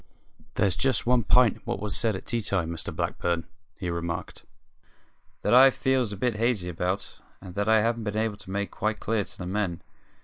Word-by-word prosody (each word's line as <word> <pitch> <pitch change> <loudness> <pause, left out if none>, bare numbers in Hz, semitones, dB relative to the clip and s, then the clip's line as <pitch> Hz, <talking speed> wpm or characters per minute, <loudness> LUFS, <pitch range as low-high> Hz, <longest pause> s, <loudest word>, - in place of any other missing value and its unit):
"There's 95 -3 +2
just 130 -4 +1
one 125 0 +4
p'int 125 0 +4
in - - -20
what - - -3
was 105 0 +1
said 115 -3 +1
at 95 - -7
tea 120 -1 -1
time, 95 -5 0
Mr 85 -3 -4
Blackburn," 85 -1 -2 0.3
he 90 -3 -3
remarked, 85 0 -4 1.0
"that - - +2
I 130 +2 +9
feels 130 -4 0
a 100 - -4
bit 120 +1 0
hazy 110 -6 0
about, 90 +3 -3 0.2
and 95 -2 -10
that 100 +3 -1
I 110 -1 +5
haven't 115 -1 -1
been 105 0 -2
able 110 -2 -1
to - - -11
make 100 +1 -2
quite 110 0 -2
clear 110 -1 0
to - - -11
the 90 - -6
men. 95 -2 -2
105 Hz, 205 wpm, -27 LUFS, 90-115 Hz, 1.0 s, I